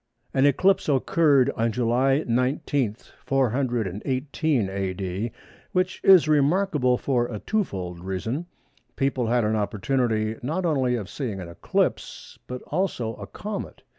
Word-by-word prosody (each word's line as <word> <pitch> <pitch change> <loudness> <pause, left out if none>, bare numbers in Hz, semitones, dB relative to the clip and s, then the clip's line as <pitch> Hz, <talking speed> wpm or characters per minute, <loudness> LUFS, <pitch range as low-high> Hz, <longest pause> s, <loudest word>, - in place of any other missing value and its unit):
An 135 +1 +4
eclipse 185 +6 +3
occurred 140 -1 +3
on 115 0 0
July 125 +5 +2
19, 125 -1 0 0.3
418 130 - 0
A.D., 95 +2 -3 0.4
which 185 0 0
is 185 -5 +7
remarkable 150 -3 +2
for 120 -3 0
a 110 - -5
twofold 95 - -3
reason. 110 - -3 0.5
People 135 -3 0
had 120 +1 +2
an 110 +1 +1
opportunity 110 +1 0
not 160 +9 -2
only 130 -6 +1
of 105 -5 -4
seeing 110 -5 -4
an 90 - -6
eclipse, 85 - -2
but 125 0 -6
also 145 -10 -2
a - - -8
comet. 210 -1 -6
125 Hz, 125 wpm, -25 LUFS, 110-145 Hz, 0.5 s, is